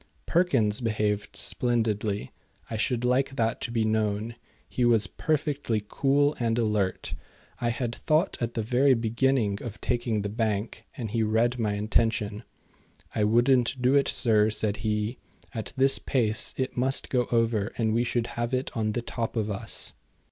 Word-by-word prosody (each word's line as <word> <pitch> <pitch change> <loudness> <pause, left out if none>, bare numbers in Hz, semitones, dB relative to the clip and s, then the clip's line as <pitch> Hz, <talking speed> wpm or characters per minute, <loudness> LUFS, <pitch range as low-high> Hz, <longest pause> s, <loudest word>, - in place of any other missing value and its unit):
Perkins 130 - +2
behaved 105 -2 -1
splendidly. 110 -4 0 0.4
I - - -2
should 120 +2 0
like 135 +2 +1
that 115 -2 0
to 115 - -3
be 115 -2 +1
known. 110 +1 0 0.3
He 125 - -2
was 115 -4 +4
perfectly 140 - -1
cool 145 +4 +2
and 115 -1 0
alert. 105 -5 0 0.5
I 120 - 0
had 120 0 -2
thought 155 +8 +1
at 120 0 -2
the 115 - -1
very 130 +4 +4
beginning 115 -2 +1
of 110 -3 -7
taking 120 -4 -1
the - - -1
bank, 110 -1 -2
and 115 -5 -4
he 115 0 0
read 115 +3 +1
my 105 -2 0
intention. 105 0 0 0.7
"I 105 - +1
wouldn't 120 +3 +3
do 125 +2 +3
it, 140 -1 +4
sir," 110 -3 +3
said 105 -1 0
he. 105 +2 -2 0.3
"At 110 -3 -5
this 135 +1 +4
pace 110 -5 0
it 130 -1 -2
must 130 +2 0
go 125 -2 +1
over 115 -3 +1
and 110 -2 +1
we 115 +2 +2
should 120 -1 0 0.2
have 120 +2 0
it 130 +2 -3
on 110 -2 0
the 120 - -2
top 115 0 -4
of 110 -2 -1
us." 100 - -2
115 Hz, 165 wpm, -27 LUFS, 110-125 Hz, 0.7 s, was